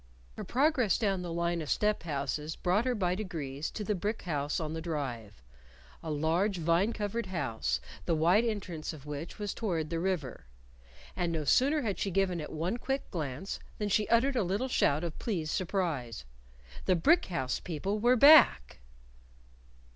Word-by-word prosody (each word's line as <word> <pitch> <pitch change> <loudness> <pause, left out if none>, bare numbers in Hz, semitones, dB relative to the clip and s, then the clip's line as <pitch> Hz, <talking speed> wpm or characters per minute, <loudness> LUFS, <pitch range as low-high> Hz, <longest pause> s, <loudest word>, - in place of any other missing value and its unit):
Her - - -6
progress 260 - +2
down 195 -5 0
the 175 -1 -5
line 170 0 -1
of 150 - -6
step 210 0 +1
houses 150 0 -3
brought 190 +6 +1
her 255 -1 +1
by 180 -4 0
degrees 160 -7 -4
to 215 - -5
the 210 - 0
brick 210 +4 -3
house 145 -4 -1
on 155 -1 -3
the 160 - -4
Drive 120 - -5 0.6
a 160 - -6
large 165 +7 +1
vine 170 +6 +2
covered 215 0 -3
house, 110 - -2 0.3
the 165 - +1
wide 175 +8 +4
entrance 185 -9 -3
of 145 -3 -12
which 150 +3 -6
was 205 -2 -3
toward 170 -8 -2
the 165 - -1
river. 165 - -3 0.7
And 175 -1 -1
no 160 -2 -2
sooner 275 - +3
had 205 -4 -2
she 200 - -1
given 185 -2 +1
it 150 - -7
one 170 +8 -2
quick 270 +2 -3
glance 155 +1 -4 0.2
than 210 -1 -2
she 210 +1 +2
uttered 255 +4 +3
a 240 - +2
little 200 +7 -1
shout 150 - +2
of 170 -2 -5
pleased 165 -9 -2
surprise. 165 - -2 0.6
The 185 - +3
brick 325 - +4
house 130 -8 -2
people 190 +6 -3
were 240 +3 +4
back! 265 - +6
175 Hz, 175 wpm, -30 LUFS, 155-210 Hz, 0.7 s, back